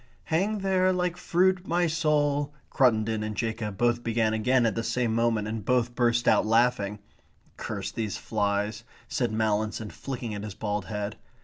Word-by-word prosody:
"'Hang 195 +7 0
there 185 -1 +3
like 180 -1 0
fruit 180 +1 +1
my 175 +1 +2
soul,'" 150 -3 +1 0.2
Cruttendon 110 -5 +2
and 105 0 -3
Jacob 110 -3 -3
both 120 +1 +1
began 110 -1 +1
again 120 +3 +2
at 115 - +2
the 115 - -2
same 115 0 0
moment, 115 -2 +1
and 110 -1 -4
both 120 +1 +1
burst 120 -1 +1
out - - +5
laughing. 110 -2 +2 0.6
"Curse - - -4
these 110 -4 -3
flies," 105 +1 -1 0.2
said 120 -3 -1
Mallinson, 110 0 -1
flicking 125 -5 -5
at 105 0 -5
his 105 -3 -6
bald 105 -2 -2
head. 105 0 -4
115 Hz, 165 wpm, -27 LUFS, 110-140 Hz, 0.6 s, out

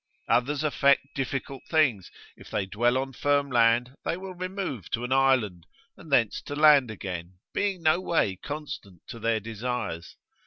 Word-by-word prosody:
Others 140 +4 +1
affect 140 -2 +2
difficult 135 -1 -3
things; 135 - +2 0.3
if - - -14
they 95 - -1
dwell 120 +6 +1
on 135 0 -3
firm 145 +1 +1
land 120 +1 +3
they 170 - -1
will 190 0 -7
remove 185 - -5
to 115 +1 -2
an 125 - -4
island, 130 -10 +2 0.3
and 155 - -14
thence 115 -6 +3
to 145 - -6
land 145 -4 +6
again, 90 -4 -6 0.2
being 195 -4 -1
no 155 +2 +4
way 165 - +1
constant 130 - -7
to 115 - -7
their 115 0 +1
desires. 110 -5 -5
130 Hz, 160 wpm, -27 LUFS, 110-150 Hz, 0.3 s, land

